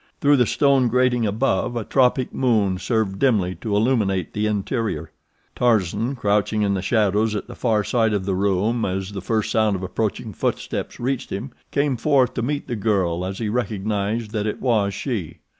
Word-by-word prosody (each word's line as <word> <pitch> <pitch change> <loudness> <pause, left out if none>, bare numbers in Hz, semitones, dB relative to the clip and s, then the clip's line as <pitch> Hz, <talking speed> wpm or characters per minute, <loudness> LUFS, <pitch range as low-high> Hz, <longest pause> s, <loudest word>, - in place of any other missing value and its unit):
Through 145 0 +4
the 125 -3 +3
stone 140 -3 +3
grating 125 -1 +2
above, 110 +1 0
a 115 - -2
tropic 130 +1 +2
moon 105 -8 +1
served 100 -1 -1
dimly 105 -9 +2
to 105 -3 -1
illuminate 105 -6 +1
the 105 +1 0
interior. 105 - -2 0.4
Tarzan, 115 +1 +1
crouching 105 -1 +1
in 100 -1 +1
the 95 - -1
shadows 105 +1 +1
at 105 - -3
the - - -10
far 110 -4 +1
side 115 0 +1
of 100 -3 -1
the 95 - 0
room 100 +4 +1
as 95 +1 -2
the 100 -1 -5
first 110 +2 -1
sound 110 -3 +2
of 95 - -5
approaching 105 +3 -3
footsteps - - -3
reached 130 +1 -2
him, 120 +7 -5 0.2
came 140 -3 0
forth 135 0 +2
to - - -2
meet 145 +4 -2
the 120 - -2
girl 95 -5 0
as 95 +1 -4
he 115 - -2
recognized 105 -1 -2
that 105 -1 -1
it 105 - -3
was 110 -6 +1
she. 105 - -4
110 Hz, 185 wpm, -22 LUFS, 100-120 Hz, 0.4 s, Through